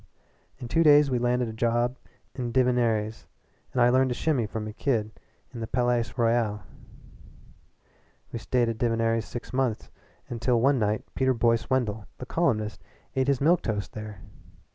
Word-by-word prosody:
"In 120 Hz, -, -7 dB
two 165 Hz, +8 st, +2 dB
days 145 Hz, -3 st, +6 dB
we 125 Hz, -, +1 dB
landed 125 Hz, 0 st, +1 dB
a 110 Hz, -, -6 dB
job 120 Hz, +2 st, 0 dB, 0.4 s
at 120 Hz, -3 st, -4 dB
Divinerries', 120 Hz, -4 st, +1 dB, 0.4 s
and 130 Hz, -, -2 dB
I 120 Hz, -, +5 dB
learned 130 Hz, +1 st, +3 dB
to 125 Hz, -, -2 dB
shimmy 135 Hz, -8 st, 0 dB
from 110 Hz, +1 st, -5 dB
a 110 Hz, -, -6 dB
kid 110 Hz, -4 st, -1 dB, 0.4 s
at 120 Hz, -, -7 dB
the 110 Hz, -, -4 dB
Palais 120 Hz, -1 st, +1 dB
Royal. 115 Hz, -3 st, +1 dB, 1.7 s
We 115 Hz, -, -4 dB
stayed 120 Hz, +1 st, +1 dB
at 115 Hz, -1 st, -3 dB
Divinerries' 115 Hz, -1 st, +1 dB
six 120 Hz, -, -8 dB
months 125 Hz, -4 st, -1 dB, 0.4 s
until 120 Hz, 0 st, 0 dB
one 135 Hz, +2 st, +3 dB
night 105 Hz, 0 st, 0 dB
Peter 130 Hz, -1 st, +1 dB
Boyce 115 Hz, 0 st, +1 dB
Wendell, 110 Hz, -5 st, -1 dB
the 125 Hz, -, -7 dB
columnist, 115 Hz, -9 st, -1 dB, 0.3 s
ate 130 Hz, 0 st, +1 dB
his 140 Hz, -3 st, +2 dB
milk 165 Hz, +5 st, +3 dB
toast 105 Hz, -3 st, -3 dB
there. 105 Hz, -3 st, -8 dB
120 Hz, 165 wpm, -27 LUFS, 110-130 Hz, 1.7 s, days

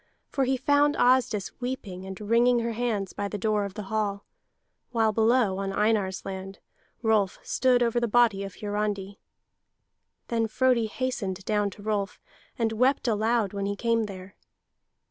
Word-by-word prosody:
For 270 Hz, -2 st, +1 dB
he 260 Hz, +1 st, +1 dB
found 290 Hz, +2 st, +3 dB
Asdis 245 Hz, -6 st, +2 dB
weeping 200 Hz, -7 st, -5 dB
and 190 Hz, 0 st, -7 dB
wringing 235 Hz, +3 st, +3 dB
her 230 Hz, 0 st, -1 dB
hands 220 Hz, -4 st, -2 dB
by 205 Hz, -, -3 dB
the 205 Hz, -, -4 dB
door 210 Hz, 0 st, 0 dB
of 200 Hz, -1 st, -7 dB
the 210 Hz, -, -5 dB
hall, 200 Hz, 0 st, -2 dB, 0.6 s
while 225 Hz, -2 st, +2 dB
below 220 Hz, -2 st, +2 dB
on 195 Hz, 0 st, -2 dB
Einar's 205 Hz, -2 st, 0 dB
land 195 Hz, 0 st, -6 dB, 0.5 s
Rolf 215 Hz, -4 st, +2 dB
stood 250 Hz, -2 st, +2 dB
over 235 Hz, 0 st, +1 dB
the 240 Hz, -, 0 dB
body 220 Hz, -3 st, +3 dB
of 195 Hz, -1 st, -7 dB
Hiarandi. 205 Hz, -1 st, -3 dB, 1.1 s
Then 230 Hz, -1 st, +1 dB
Frodi 245 Hz, 0 st, +2 dB
hastened 210 Hz, -6 st, -3 dB
down 210 Hz, -1 st, +1 dB
to 205 Hz, +1 st, -13 dB
Rolf 205 Hz, -2 st, -2 dB, 0.4 s
and 225 Hz, -3 st, +1 dB
wept 255 Hz, +4 st, +2 dB
aloud 220 Hz, -1 st, +1 dB
when 200 Hz, 0 st, -2 dB
he 200 Hz, -, -2 dB
came 230 Hz, +1 st, +1 dB
there. 190 Hz, -1 st, -9 dB
215 Hz, 160 wpm, -27 LUFS, 200-240 Hz, 1.1 s, found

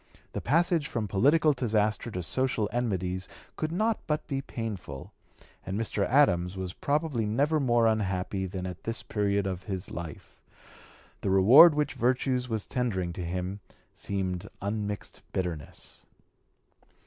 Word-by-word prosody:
The -, -, -3 dB
passage 165 Hz, +2 st, +2 dB
from 115 Hz, -6 st, -2 dB
political 145 Hz, +10 st, +4 dB
disaster 110 Hz, -3 st, 0 dB
to 90 Hz, -5 st, -4 dB
social 125 Hz, 0 st, 0 dB
enmities 95 Hz, -7 st, -1 dB, 0.3 s
could 155 Hz, -, -2 dB
not 215 Hz, +5 st, +1 dB
but 150 Hz, -1 st, -1 dB
be 135 Hz, -3 st, -2 dB
painful; 105 Hz, -, -6 dB, 0.5 s
and 95 Hz, +2 st, -3 dB
Mr. 105 Hz, -3 st, 0 dB
Adams 95 Hz, -9 st, +3 dB
was 95 Hz, -1 st, -4 dB
probably 145 Hz, -6 st, 0 dB
never 145 Hz, +8 st, +2 dB
more 120 Hz, -4 st, +3 dB
unhappy 95 Hz, -3 st, 0 dB
than 95 Hz, 0 st, -5 dB
at 90 Hz, -1 st, -6 dB
this 115 Hz, +1 st, -4 dB
period 100 Hz, -1 st, 0 dB
of 95 Hz, -1 st, -4 dB
his 95 Hz, -3 st, -4 dB
life. 85 Hz, -4 st, -8 dB, 0.8 s
The -, -, -1 dB
reward 120 Hz, -, +8 dB
which 150 Hz, -1 st, 0 dB
virtue 125 Hz, +1 st, +1 dB
was 110 Hz, -3 st, -2 dB
tendering 95 Hz, -9 st, -1 dB
to 90 Hz, -, -5 dB
him 90 Hz, +3 st, -3 dB, 0.3 s
seemed 95 Hz, -3 st, -3 dB
unmixed 105 Hz, 0 st, -4 dB
bitterness. 85 Hz, -6 st, -5 dB
105 Hz, 135 wpm, -28 LUFS, 95-130 Hz, 0.8 s, reward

